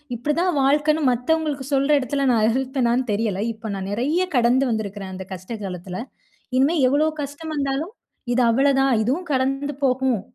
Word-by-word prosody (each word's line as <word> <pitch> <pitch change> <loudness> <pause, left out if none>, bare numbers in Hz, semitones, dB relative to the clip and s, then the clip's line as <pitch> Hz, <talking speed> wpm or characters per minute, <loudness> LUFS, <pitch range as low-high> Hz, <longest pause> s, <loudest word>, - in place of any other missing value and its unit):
இப்டி 245 +6 -2
தான் 365 +1 +2
வாழ்க்கைன்னு 295 +3 +2
மத்தவங்களுக்கு 290 +2 -1
சொல்ற 275 +1 +2
இடத்துல 275 +2 -1
நான் 220 -2 +3
இருப்பேனானு 255 0 0
தெரியல. 205 -2 -1
இப்ப 220 0 -8
நான் 195 0 -5
நெறைய 290 - 0
கடந்து 245 +3 +3
வந்திருக்கிறன் 205 -3 -4
அந்த 190 0 -7
கஷ்ட 185 +5 -7
காலத்துல. 180 -1 -6 0.6
இனிமேல் 280 +2 +3
எவ்ளோ 295 +4 +2
கஷ்டம் 290 +3 -6
வந்தாலும், 280 +7 -2 0.4
இது 255 - +3
அவ்ளோ 275 +4 +3
தான் 270 -2 +3
இதுவும் 315 +10 -1
கடந்து 270 +2 -1
போகும். 255 -4 +1
265 Hz, 155 wpm, -22 LUFS, 225-285 Hz, 0.6 s, நான்